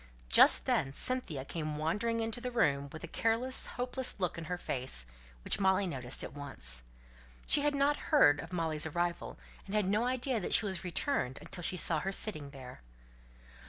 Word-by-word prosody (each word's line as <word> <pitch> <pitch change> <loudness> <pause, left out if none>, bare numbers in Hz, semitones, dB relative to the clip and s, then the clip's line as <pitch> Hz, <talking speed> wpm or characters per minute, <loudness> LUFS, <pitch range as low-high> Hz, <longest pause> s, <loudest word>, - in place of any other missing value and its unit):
Just - - +7
then 135 - 0
Cynthia 165 - -2
came 155 -1 -4
wandering 210 +9 -1
into 225 +1 -2
the 250 - -3
room 140 - 0
with 155 - -10
a - - -5
careless, 230 +8 0
hopeless 250 -1 +1
look 180 -2 -1
in 165 - -7
her 180 +2 -4
face, 130 - -2 0.4
which - - 0
Molly 190 0 +2
noticed 130 -7 -2
at - - -7
once. 65 - +2 0.6
She 290 - +4
had 290 0 0
not 280 +1 +2
heard 210 - +5
of 170 - -8
Molly's 160 -3 -1
arrival, 175 +2 -3 0.3
and 200 - -5
had 210 -2 +2
no 210 +5 +1
idea 255 -1 -1
that 180 - +1
she - - +4
was 190 -3 -3
returned 175 - -1
until 180 - -9
she 180 +2 -1
saw 160 -2 +3
her 190 +5 -3
sitting 155 -8 -2
there. 130 - -12
180 Hz, 185 wpm, -32 LUFS, 145-230 Hz, 0.6 s, Just